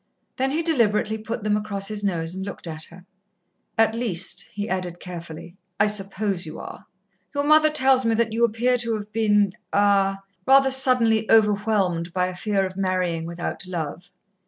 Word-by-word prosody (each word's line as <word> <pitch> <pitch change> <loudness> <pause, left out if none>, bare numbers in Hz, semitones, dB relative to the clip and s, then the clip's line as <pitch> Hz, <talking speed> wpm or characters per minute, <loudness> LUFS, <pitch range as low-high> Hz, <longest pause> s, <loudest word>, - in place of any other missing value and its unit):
Then 265 +1 +1
he 315 +4 -1
deliberately 220 -8 +1
put 225 0 -5
them 210 0 +1
across 205 -2 -2
his 210 -1 -4
nose 170 -4 -1
and 190 +1 -5
looked 200 -1 -6
at 160 -1 -5
her. 180 +1 -15 0.7
"At 225 0 +3
least," 210 -7 -1
he 205 +1 -4
added 180 -3 -3
carefully, 170 0 -9 0.2
"I 205 - +5
suppose 200 -2 -1
you 155 -1 -8
are. - - -10 0.5
Your 285 - 0
mother 310 +1 +5
tells 265 -3 +3
me 230 -1 +1
that 225 -1 0
you 230 +1 +1
appear 240 +2 +2
to 230 -1 0
have 210 0 -7
been 210 -3 +2 0.2
er 200 -1 +3 0.3
rather 270 0 +6
suddenly 240 -4 +4
overwhelmed 205 -6 +2
by 180 -1 +1
a 185 0 -5
fear 195 0 0
of 185 0 -6
marrying 185 -4 -1
without 170 +2 -5
love. 175 0 -5
205 Hz, 175 wpm, -23 LUFS, 185-225 Hz, 0.7 s, rather